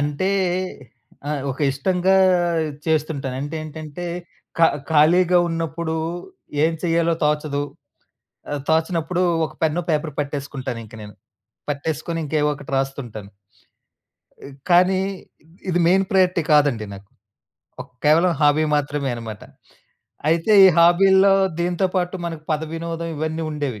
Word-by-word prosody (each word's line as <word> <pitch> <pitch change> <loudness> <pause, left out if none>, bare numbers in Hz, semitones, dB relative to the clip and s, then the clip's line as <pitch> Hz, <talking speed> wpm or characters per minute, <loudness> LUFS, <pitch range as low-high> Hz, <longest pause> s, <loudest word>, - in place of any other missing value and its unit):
అంటే 150 +7 -1 1.0
ఆహ్, 150 -2 -2
ఒక 130 - -7
ఇష్టంగా 185 +7 +1 0.7
చేస్తుంటాను. 150 -4 -1
అంటే 145 +3 -5
ఏంటంటే 155 +2 -8 0.5
ఖ - - -1 0.3
ఖాళీగా 175 +4 +4
ఉన్నప్పుడు 165 0 -3 0.7
ఏం 165 - +2
చేయాలో 170 -1 +1
తోచదు. 150 -1 0 0.9
ఆహ్, 145 -1 -2
తోచనప్పుడు 165 +2 0 0.2
ఒక - - -13
పెన్ను, 160 +3 0
పేపరు 150 -1 -1
పట్టేసుకుంటాను 140 -4 -5
ఇంక 110 +1 -15
నేను. 105 -1 -11 0.6
పట్టేసుకొని 155 +3 -3
ఇంకా 155 - -2
ఏవో 150 - +2
ఒకటి 140 -1 -11
రాస్తుంటాను. 120 -7 -5 1.4
కానీ 180 +2 +4 0.7
ఇది 175 0 +1
మెయిన్ 190 +2 +3
ప్రయారిటీ 185 -2 +3
కాదండి 140 -7 +3
నాకు. 100 0 -13 0.7
ఒక 130 - -8 0.2
కేవలం 165 +4 +4
హాబీ 150 +1 +4
మాత్రమే 145 -1 -2
అనమాట. 115 -3 -8 0.9
అయితే 165 +6 +2
ఈ - - +10
హాబీల్లో 190 +3 +5 0.3
దీనితో 175 +2 +1
పాటు 180 +1 -1
మనకు 165 -2 -6
పదవినోదం 165 +2 -4
ఇవన్నీ 160 +2 -3
ఉండేవి. 145 -7 -4
155 Hz, 115 wpm, -21 LUFS, 145-170 Hz, 1.4 s, ఈ